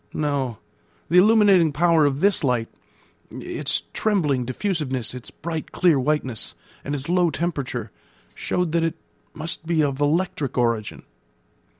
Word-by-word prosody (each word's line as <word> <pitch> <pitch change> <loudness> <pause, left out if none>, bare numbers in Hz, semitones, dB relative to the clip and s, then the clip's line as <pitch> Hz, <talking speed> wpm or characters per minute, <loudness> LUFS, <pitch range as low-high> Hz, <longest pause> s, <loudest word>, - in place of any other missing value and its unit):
No; 140 -6 -1 0.5
the 180 - +6
illuminating 200 -5 +5
power 160 0 +3
of 140 +1 -2
this 200 -4 +3
light, 125 -4 +1 0.6
its - - -3
trembling 150 - +1
diffusiveness, 130 - -2
its 125 -3 -8
bright, 160 -1 -6
clear 170 -6 +3
whiteness, 130 -4 -1 0.3
and 145 - -3
its 135 0 -6
low 175 0 +3
temperature, 140 -10 -3 0.4
showed 180 - -1
that 165 0 +1
it 165 - -1 0.4
must 160 0 -4
be 165 -2 +2
of 140 -1 -1
electric 150 -3 0
origin. 115 -3 0
150 Hz, 130 wpm, -23 LUFS, 130-170 Hz, 0.6 s, the